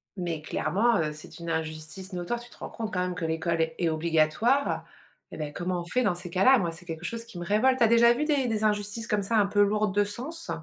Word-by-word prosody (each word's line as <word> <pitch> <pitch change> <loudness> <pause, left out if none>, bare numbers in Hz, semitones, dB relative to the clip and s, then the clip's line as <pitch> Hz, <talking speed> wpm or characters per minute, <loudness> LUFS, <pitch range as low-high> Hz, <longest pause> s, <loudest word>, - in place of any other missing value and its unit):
mais 170 -4 -3
clairement, 225 +8 +1
heu, 155 -1 0
c'est 155 +2 -11
une 170 0 -6
injustice 160 +4 -4
notoire, 180 +7 -3
tu 240 0 -12
te - - -17
rends - - -7
compte 220 -3 -5
quand 180 - 0
même 180 0 -2
que 180 - -3
l'école 160 +1 0
est 160 0 -1
est 170 -2 +1
obligatoire? 165 - +1 0.5
Eh - - -8
ben 150 -2 -4
comment 175 0 -2
on - - -8
fait 250 +8 0
dans 185 -5 +1
ces 175 0 -6
cas-là? 250 +10 +5
Moi, 170 -5 -1
c'est 175 +2 -12
quelque 165 0 -6
chose 230 +3 -4
qui 230 -6 -11
me 175 - -5
révolte. 255 +7 +3
Tu - - +4
as - - +6
déjà 235 +1 +6
vu 280 +5 -1
des 285 -5 +1
des 220 -1 -1
injustices 210 +2 0
comme 210 -2 +1
ça 225 +3 0
un 205 - +5
peu 205 0 +2
lourdes 210 -1 +2
de 205 0 +3
sens? 285 +11 -5
195 Hz, 265 wpm, -27 LUFS, 170-230 Hz, 0.5 s, as